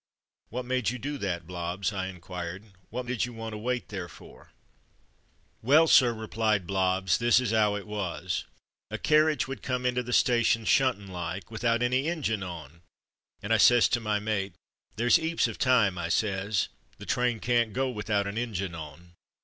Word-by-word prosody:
''What 125 Hz, +2 st, -4 dB
made 125 Hz, -3 st, 0 dB
you 125 Hz, -, -4 dB
do 145 Hz, +3 st, -5 dB
that, 90 Hz, -5 st, -3 dB
Blobbs.?'' 90 Hz, +3 st, -3 dB
I 95 Hz, -1 st, -2 dB
inquired. 90 Hz, 0 st, -7 dB, 0.3 s
"What 125 Hz, +2 st, -4 dB
did 125 Hz, -1 st, -1 dB
you 120 Hz, -, -9 dB
want 115 Hz, -1 st, -6 dB
to 105 Hz, -, -5 dB
wait 125 Hz, +2 st, -2 dB
there 95 Hz, -4 st, -5 dB
for?'' -, -, -15 dB, 1.1 s
"Well, 145 Hz, +8 st, +5 dB
sir," 125 Hz, -5 st, +6 dB
replied 110 Hz, -3 st, -1 dB
Blobbs, 95 Hz, 0 st, +1 dB
"this 120 Hz, +1 st, +4 dB
is 120 Hz, -4 st, -1 dB
'ow 105 Hz, -2 st, +3 dB
it 100 Hz, -, -5 dB
was. 95 Hz, -4 st, -3 dB, 0.4 s
A -, -, -4 dB
carriage 155 Hz, -3 st, +3 dB
would 135 Hz, 0 st, -6 dB
come 125 Hz, -1 st, -2 dB
into 125 Hz, 0 st, +1 dB
the 125 Hz, 0 st, -7 dB
sta 120 Hz, -1 st, +3 dB
tion, 115 Hz, -1 st, +2 dB
shuntin' 130 Hz, -6 st, +2 dB
like, 90 Hz, +2 st, -6 dB
without 115 Hz, +1 st, 0 dB
any 130 Hz, +4 st, +1 dB
injun 145 Hz, -11 st, -1 dB
on, 85 Hz, -3 st, -8 dB, 0.6 s
and 105 Hz, +2 st, 0 dB
I -, -, +5 dB
says 120 Hz, +2 st, +6 dB
to 120 Hz, -, +1 dB
my 105 Hz, -2 st, 0 dB
mate, 100 Hz, -3 st, -2 dB, 0.4 s
'There's 120 Hz, +8 st, +4 dB
'eaps 165 Hz, +1 st, +1 dB
of -, -, -7 dB
time,' 115 Hz, -9 st, +3 dB
I 85 Hz, 0 st, -3 dB
says; 100 Hz, 0 st, 0 dB, 0.3 s
'the -, -, -10 dB
train 120 Hz, -2 st, 0 dB
can't 120 Hz, -1 st, +1 dB
go 130 Hz, +4 st, 0 dB
without 105 Hz, -2 st, -1 dB
an 100 Hz, +3 st, -3 dB
injun 95 Hz, -7 st, -3 dB
on.' 80 Hz, +2 st, -10 dB
110 Hz, 180 wpm, -28 LUFS, 95-125 Hz, 1.1 s, sir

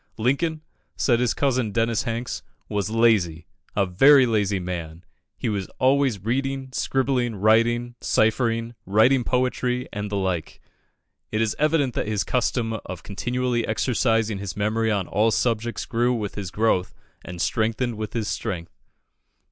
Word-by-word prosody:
"Lincoln," 155 Hz, +7 st, 0 dB, 0.3 s
said 120 Hz, -3 st, +2 dB
his 125 Hz, -2 st, +1 dB
cousin, 130 Hz, -6 st, +1 dB
Dennis 115 Hz, +1 st, +1 dB
Hanks, 115 Hz, +1 st, -3 dB, 0.3 s
"was 100 Hz, -2 st, -2 dB
lazy 105 Hz, -8 st, +2 dB, 0.3 s
a 100 Hz, -, +3 dB
very 135 Hz, +9 st, +6 dB
lazy 105 Hz, -4 st, +1 dB
man. 85 Hz, -2 st, -6 dB, 0.3 s
He -, -, -3 dB
was 100 Hz, -4 st, -2 dB
always 130 Hz, -6 st, +2 dB
reading, 135 Hz, +2 st, -1 dB
scribbling, 130 Hz, -3 st, 0 dB
writing, 115 Hz, +4 st, +2 dB
ciphering, 115 Hz, +1 st, +1 dB
writing 120 Hz, +6 st, +4 dB
poetry, 125 Hz, 0 st, 0 dB
and 105 Hz, -1 st, -4 dB
the 105 Hz, -, -3 dB
like." 95 Hz, -4 st, -2 dB, 0.7 s
It 110 Hz, -, -1 dB
is 110 Hz, -1 st, +1 dB
evident 150 Hz, -4 st, +2 dB
that -, -, -2 dB
his 105 Hz, -2 st, 0 dB
custom 115 Hz, -2 st, -1 dB
of 90 Hz, -2 st, -8 dB
continually 120 Hz, +3 st, -1 dB
exercising 115 Hz, -2 st, +1 dB
his 100 Hz, -1 st, -6 dB
memory 110 Hz, +2 st, 0 dB
on 100 Hz, -4 st, 0 dB
all 110 Hz, +3 st, +2 dB
subjects 115 Hz, 0 st, -1 dB
grew 120 Hz, +1 st, +1 dB
with 105 Hz, -4 st, -3 dB
his 100 Hz, -3 st, -5 dB
growth 105 Hz, -2 st, 0 dB, 0.3 s
and 90 Hz, -1 st, -8 dB
strengthened 115 Hz, +6 st, 0 dB
with 110 Hz, +1 st, -5 dB
his 115 Hz, -3 st, -2 dB
strength. 90 Hz, -7 st, -4 dB
115 Hz, 145 wpm, -24 LUFS, 105-125 Hz, 0.7 s, very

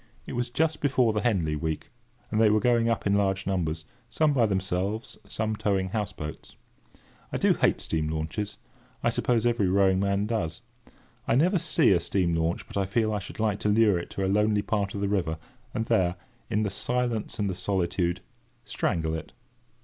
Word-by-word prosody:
It -, -, -7 dB
was 120 Hz, 0 st, -1 dB
just 155 Hz, +5 st, 0 dB
before 130 Hz, -5 st, +3 dB
the 105 Hz, -, 0 dB
Henley 90 Hz, -10 st, +1 dB
week, 80 Hz, +1 st, -3 dB, 0.4 s
and 110 Hz, -, +2 dB
they 110 Hz, -, +6 dB
were 105 Hz, +1 st, +4 dB
going 115 Hz, 0 st, +3 dB
up 115 Hz, -, -1 dB
in 100 Hz, -, +3 dB
large 100 Hz, -1 st, +1 dB
numbers; 80 Hz, -4 st, -1 dB, 0.2 s
some 155 Hz, -2 st, +2 dB
by 120 Hz, -5 st, +3 dB
themselves, 95 Hz, +2 st, -2 dB
some 110 Hz, +1 st, -2 dB
towing 95 Hz, -3 st, 0 dB
houseboats. 95 Hz, -7 st, -5 dB, 0.8 s
I -, -, -1 dB
do -, -, +4 dB
hate -, -, +2 dB
steam 80 Hz, -1 st, -2 dB
launches: 80 Hz, +7 st, -3 dB, 0.5 s
I -, -, +3 dB
suppose 120 Hz, -2 st, +1 dB
every 120 Hz, -5 st, +2 dB
rowing 95 Hz, 0 st, +3 dB
man 100 Hz, +1 st, +1 dB
does. 90 Hz, -8 st, -2 dB, 0.7 s
I 115 Hz, -, +3 dB
never 180 Hz, +8 st, +3 dB
see -, -, +3 dB
a 90 Hz, -, +4 dB
steam 85 Hz, 0 st, 0 dB
launch 80 Hz, +1 st, 0 dB
but -, -, -7 dB
I 100 Hz, -1 st, +1 dB
feel 110 Hz, +2 st, +1 dB
I 105 Hz, -, 0 dB
should 100 Hz, -, -10 dB
like 105 Hz, -2 st, +1 dB
to 105 Hz, -, 0 dB
lure 105 Hz, -3 st, +4 dB
it 85 Hz, -, -7 dB
to 95 Hz, -, 0 dB
a -, -, +1 dB
lonely 105 Hz, +1 st, +2 dB
part 100 Hz, -2 st, -1 dB
of 100 Hz, -, -3 dB
the 100 Hz, -, +1 dB
river, 90 Hz, -6 st, 0 dB, 0.3 s
and 115 Hz, -, -2 dB
there, 95 Hz, -7 st, +2 dB, 0.3 s
in 105 Hz, +1 st, +1 dB
the 100 Hz, -, -1 dB
silence 120 Hz, 0 st, -1 dB
and 105 Hz, -3 st, 0 dB
the 95 Hz, -, -1 dB
solitude, 90 Hz, -1 st, -1 dB, 0.4 s
strangle 80 Hz, -5 st, -1 dB
it. 80 Hz, -, -6 dB
100 Hz, 195 wpm, -27 LUFS, 90-110 Hz, 0.8 s, they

